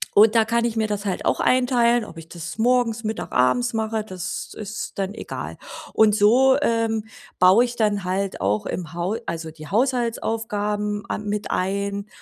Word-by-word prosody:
Und 215 +2 +6
da 225 - +6
kann 235 +1 +1
ich 235 -1 -1
mir 220 -1 +1
das 205 -1 -3
halt 190 -2 -2
auch - - +1
einteilen, 245 -2 +3
ob 165 - -12
ich 165 0 -10
das 170 +3 -7
morgens, 235 -1 +2
Mittag, 220 0 -4
abends 240 - +2
mache, 220 -1 -1
das 185 -4 -6
ist 215 +1 -6
dann 195 0 -2
egal. - - -6 0.4
Und 215 -2 +5
so, 250 +6 +5
ähm, 225 -4 0 0.3
baue 185 +6 +6
ich 240 0 -7
dann 210 -3 +1
halt 190 - -2
auch 105 +2 0
im 170 -3 -5
Hau 175 +5 -1
also, 165 -1 -4
die 155 -1 -11
Haushaltsaufgaben 220 -3 -1
a - - -1
mit 210 0 -3
ein, 200 +2 -1
210 Hz, 175 wpm, -23 LUFS, 195-230 Hz, 0.4 s, Und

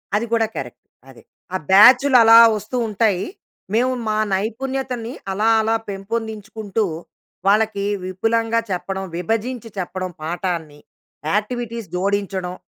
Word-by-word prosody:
అది 215 +3 0
కూడా 225 -1 +3
కరెక్ట్ 125 -3 -7 0.3
అదే. 130 - -16 0.3
ఆ - - +2
బ్యాచ్‌లు 250 +6 +7
అలా 225 +1 +8 0.2
వస్తూ 215 +5 -5
ఉంటాయి. 205 -3 +1 0.5
మేము 250 +3 +2 0.2
మా 215 - 0 0.2
నైపుణ్యతని 245 +3 -3 0.2
అలా 210 +3 0
అలా 225 +1 +1
పెంపొందించుకుంటూ 215 +1 -4 0.6
వాళ్ళకి 210 -1 +2 0.2
విపులంగా 225 +5 0
చెప్పడం, 190 +1 -3
విభజించి 225 +5 -3
చెప్పడం 185 0 -4
పాఠాన్ని 165 -3 -4 0.5
యాక్టివిటీస్ 230 0 -3
జోడించడం, 190 -1 -1
215 Hz, 110 wpm, -20 LUFS, 190-230 Hz, 0.6 s, అలా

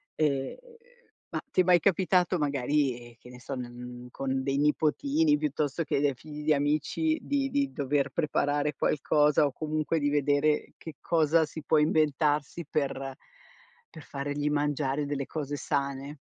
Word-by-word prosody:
ehm, 140 -3 0 0.7
ma - - -3
ti 185 - +3
è - - +3
mai 180 -1 +5
capitato 185 0 +2
magari, 140 -2 0
ehm, - - -18
che 125 - -15
ne 125 - -12
so, 135 +2 -6
ne 125 -1 -5
n 125 0 -9
con 135 -1 -2
dei 135 0 0
nipotini, 280 - +2
piuttosto 165 - -1
che 150 - 0
dei 145 -1 +2
figli 150 +3 -9
di 155 - +4
amici, 155 - 0
di 275 -1 -1
di 280 0 0
dover 140 -1 0
preparare 145 -2 0
qualcosa 150 +1 +3
o 140 - 0
comunque 155 +2 -1
di 145 - +1
vedere 145 +1 +1
che 160 -3 -9
cosa 160 -1 +3
si 155 +1 -9
può 155 +2 +3
inventarsi 150 0 +1
per 135 -2 -2 0.7
per 155 - -12
fargli 145 +1 -3
mangiare 145 -1 0
delle 140 -1 -3
cose 145 -1 -4
sane? 140 0 -3
150 Hz, 160 wpm, -28 LUFS, 140-155 Hz, 0.7 s, mai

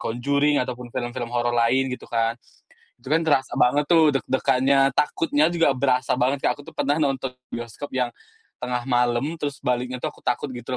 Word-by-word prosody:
Conjuring 140 +5 +1
ataupun 125 -1 -5
film-film 120 0 -4
horor 120 0 0
lain 130 +3 +2
gitu 125 - -8
kan. 115 -1 +1 0.7
Itu 125 +3 -11
kan 160 +1 +3
terasa 135 -4 +1
banget 145 +4 +3
tuh 160 -4 +5
deg-degannya, 135 0 +2
takutnya 150 +1 +2
juga 165 -5 +2
berasa 130 -1 +1
banget, 130 +3 +1
Kak. - - +4
Aku - - -10
tuh - - -12
pernah 145 +2 0
nonton 135 -2 -1 0.2
bioskop 120 +4 -7
yang, 125 -2 -1 0.5
tengah 125 -1 -2
malam, 120 -1 +1 0.2
terus 145 -2 -3
baliknya 125 +1 -1
tuh 125 - -4
aku - - -20
takut 120 - -1
gitu 125 +1 -5
130 Hz, 180 wpm, -23 LUFS, 120-140 Hz, 0.7 s, tuh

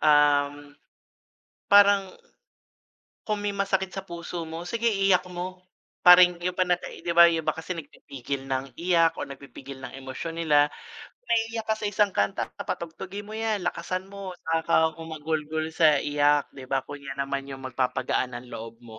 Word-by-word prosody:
um, 145 -1 +4 1.2
parang, 200 -1 +6 1.1
kung 215 -1 -1
may 205 - -1
masakit 190 -1 -1
sa 195 - -4
puso 170 -1 -6
mo, 165 +2 -7
sige 230 +5 0
iiyak 195 -3 +2
mo. 180 +1 -7 0.4
Parang 180 -1 +8
yung 180 - -3
pana 180 -1 +2
eh, - - -11
'di 175 - -1
ba 170 0 +8
yung 165 -1 0
iba - - +1
kasi 165 +3 -6
nagpipigil 140 -3 -7
ng 135 0 -2
iyak 170 -1 +3
o - - -4
nagpipigil 135 0 -10
ng 130 - -6
emosyon 150 +5 -6
nila. 150 -3 +3 0.4
Kung - - -28
naiiyak 225 0 +1
ka 220 - +4
sa 210 - -3
isang 205 0 +2
kanta 100 - -1
patugtugin 185 +4 -5
mo 215 +1 -8
yan, 220 -3 -1
lakasan 185 +2 -3
mo 195 -2 -7
'saka 160 0 -1
ka 170 - +3 0.2
humagulgol 160 0 -3
sa 160 -1 +5
iyak, 145 0 +2
'di 130 -2 -11
ba? 135 0 0
Kung 145 +2 -9
yan 135 0 -4
naman 140 0 -3
yung 135 -1 -8
magpapagaan 125 0 -1
ng 120 +1 -9
loob 115 +1 -9
mo, 110 -2 -12
165 Hz, 170 wpm, -26 LUFS, 140-185 Hz, 1.2 s, Parang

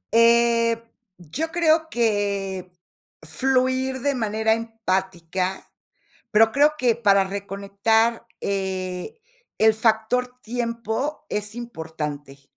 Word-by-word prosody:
Eh, 230 0 +4 0.4
yo 180 - -4
creo 320 -1 +2
que 200 -5 -1 0.5
fluir 260 +8 0
de 285 +1 +1
manera 220 -2 +1
empática, 190 -5 -3 0.6
pero 220 +1 +5
creo 295 +2 +4
que 245 -5 +2
para 200 -4 +4
reconectar, 200 +4 0
eh, 190 - -3 0.4
el 220 0 +5
factor 230 +3 +1
tiempo 235 +5 -3
es 210 +1 -3
importante. 150 - -6
220 Hz, 90 wpm, -23 LUFS, 195-240 Hz, 0.6 s, pero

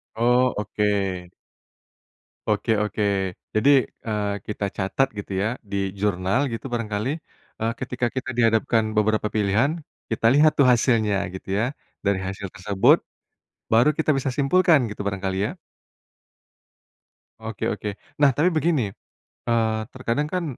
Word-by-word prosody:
Oh, 125 +2 +3
oke. 100 -3 -1 1.2
Oke 105 +2 0
oke. 105 0 -2 0.5
Jadi, 110 +6 +4 0.4
eee, 105 -2 -1
kita 105 -1 -3
catat 100 +8 +1
gitu 100 - -6
ya - - +1 0.2
di - - -2 0.2
jurnal 95 +2 +1
gitu 115 - -6
barangkali, 110 0 -2 0.5
eee, 115 +1 0
ketika 125 -1 -2
kita 130 +1 -3
dihadapkan 115 -1 +3
beberapa 105 0 +2
pilihan, 105 +6 +2 0.4
kita 115 0 -2
lihat 155 +2 +6
tuh 140 - +4
hasilnya 115 -4 +2 0.2
gitu 95 - -10
ya. 115 - +2 0.4
Dari 100 -1 +2
hasil 95 +1 -5
tersebut 100 - +4 0.7
baru 115 +6 +5
kita 160 -1 +2
bisa 135 - -2
simpulkan, 160 +3 +4
gitu 105 - -6
barangkali 95 -1 -2
ya? - - -4 1.9
Oke 110 -2 -3
oke. 105 -1 -3 0.2
Nah, 145 -2 +5
tapi 155 +8 +3
begini, 155 - +1 0.6
eee, 110 -2 +1
terkadang 130 +3 -1
kan 180 -1 -1
110 Hz, 130 wpm, -24 LUFS, 105-130 Hz, 1.9 s, lihat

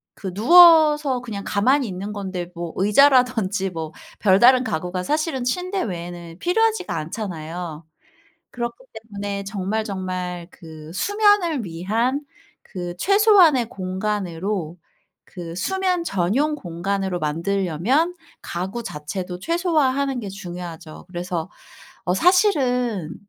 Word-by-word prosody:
그 190 - -6
누워서 300 - +6
그냥 215 -5 -6
가만히 250 +5 +2
있는 195 +2 -5
건데 185 -3 -5
뭐 170 -1 -5
의자라든지 215 -3 +3
뭐 160 -2 -5 0.3
별다른 240 +6 +5
가구가 180 -4 -3
사실은 300 - -1
침대 365 +9 -1
외에는 175 -3 -6
필요하지가 440 - +1
않잖아요. 165 -1 -5 0.7
그렇기 235 -1 -4 0.3
때문에 200 -2 -5
정말 200 +2 -2
정말 185 -3 -4
그 160 -3 -12
수면을 405 - +2
위한 220 - -1 0.4
그 175 -2 -6
최소한의 390 - +5
공간으로 185 -3 -3 0.5
그 170 -2 -8
수면 365 - -1
전용 245 - 0
공간으로 190 - -3
만들려면 190 - 0 0.3
가구 190 +7 -4
자체도 180 +2 -5
최소화하는 280 - +1
게 210 - -6
중요하죠. 175 -4 -8
그래서 175 -1 -4 0.5
어 180 - +1
사실은 250 - +2
200 Hz, 265 characters per minute, -22 LUFS, 180-275 Hz, 0.7 s, 누워서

